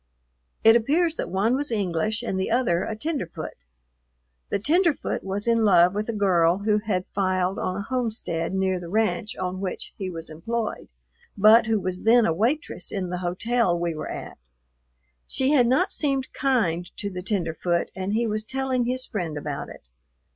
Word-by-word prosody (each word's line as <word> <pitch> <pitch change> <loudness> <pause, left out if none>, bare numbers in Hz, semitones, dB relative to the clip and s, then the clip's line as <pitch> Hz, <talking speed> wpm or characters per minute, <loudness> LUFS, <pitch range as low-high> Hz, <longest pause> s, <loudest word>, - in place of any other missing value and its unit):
It 225 +1 +8
appears 310 +8 +2
that - - -3
one 200 +7 +1
was 290 +2 -2
English 210 +2 -1
and 190 -5 -2
the 190 - -1
other 230 -8 +2
a 220 - -4
tenderfoot. 220 - -5 0.8
The - - +1
tenderfoot 330 - +1
was 195 +2 -3
in 230 -1 +3
love 180 -3 +5
with 210 +2 -3
a - - +2
girl 180 -5 +3
who 210 +1 +1
had 200 -4 -2
filed 185 -1 0
on 185 - -2
a 200 - -3
homestead 220 -9 -2
near 190 -1 +1
the 170 -1 -8
ranch 220 +3 0
on 185 0 -3
which 190 -2 -5
he 190 -2 -4
was 165 -2 -7
employed, 220 +8 -4 0.5
but 220 +3 +6
who 220 -1 +2
was 185 -1 -3
then 230 +1 +5
a 165 - +2
waitress 230 - -1
in 185 -3 -3
the 180 - -2
hotel 185 +2 0
we 170 -1 -1
were 155 - -5
at. - - -7 0.9
She 265 +1 +1
had 255 -5 +5
not 360 +11 +2
seemed 275 -3 -1
kind 180 - 0
to 200 - -4
the 180 -1 -5
tenderfoot 175 -3 -1
and 190 +2 -3
he 235 +2 +1
was 215 -1 -1
telling 260 +1 -1
his 255 +1 0
friend 170 -7 -4
about 145 -1 -5
it. - - -13
205 Hz, 180 wpm, -25 LUFS, 180-235 Hz, 0.9 s, It